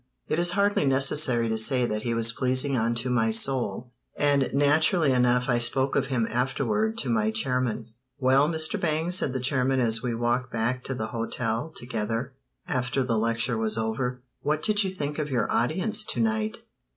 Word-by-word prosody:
It 155 - -1
is 175 0 +3
hardly 200 -4 +1
necessary 135 -3 +3
to 110 0 -1
say 125 +2 +2
that 105 -2 -3
he 115 0 -2
was 115 0 +3
pleasing 130 +3 +1
unto 115 +1 0
my 115 -3 +1
soul, 120 0 0 0.3
and 140 -2 +2
naturally 150 +2 +3
enough 125 -1 +2
I 120 -2 +1
spoke 130 +3 0
of 135 - +1
him 125 -4 0
afterward 210 - -1
to 130 - -4
my 110 -1 +1
chairman. 120 0 -1 0.2
"Well, 135 +2 +3
Mr. 160 -1 -1
Bangs," 160 +1 0
said 145 - +1
the 130 - -3
chairman 130 0 +1
as 115 -2 +2
we 120 -2 -2
walked 120 +2 -1
back 120 +3 -2
to 135 - -3
the 110 -2 -4
hotel 115 +3 -3
together 115 +2 -4 0.3
after 130 +1 -1
the 115 -3 0
lecture 115 +1 0
was 110 0 -1
over, 125 +3 -3 0.2
"what 150 +1 -1
did 210 -1 +2
you 190 - -2
think 150 -5 -5
of 150 -1 -3
your 125 -5 -1
audience 190 - +1
to - - -3
night? 220 0 -1
125 Hz, 185 wpm, -26 LUFS, 115-145 Hz, 0.3 s, is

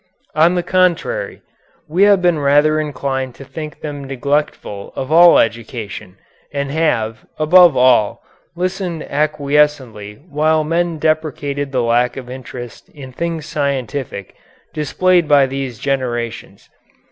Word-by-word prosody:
On 165 +4 +3
the 175 - 0
contrary, 185 - 0 0.4
we 170 +5 -1
have 195 -3 +3
been 175 -3 +3
rather 145 +2 +3
inclined 135 -3 -3
to - - -11
think 150 +3 -8
them 145 -2 -6
neglectful 135 -6 -3
of 130 +2 -5
all 170 +1 +7
education, 110 -5 -3 0.3
and 140 -1 -3
have, 115 -8 -1
above 165 -1 +6
all, 125 -4 +3 0.3
listened 180 -2 -3
acquiescently 145 -7 0
while 155 0 +1
men 170 +1 -1
deprecated 145 -3 -1
the 125 -2 0
lack 120 +2 +1
of 125 -2 -8
interest 125 -2 -9
in 135 -3 -11
things 165 +3 -4
scientific 135 -8 -3 0.4
displayed 175 +3 +1
by 145 -2 +5
these 135 -3 -5
generations. 120 -3 -4
145 Hz, 125 wpm, -17 LUFS, 130-160 Hz, 0.4 s, all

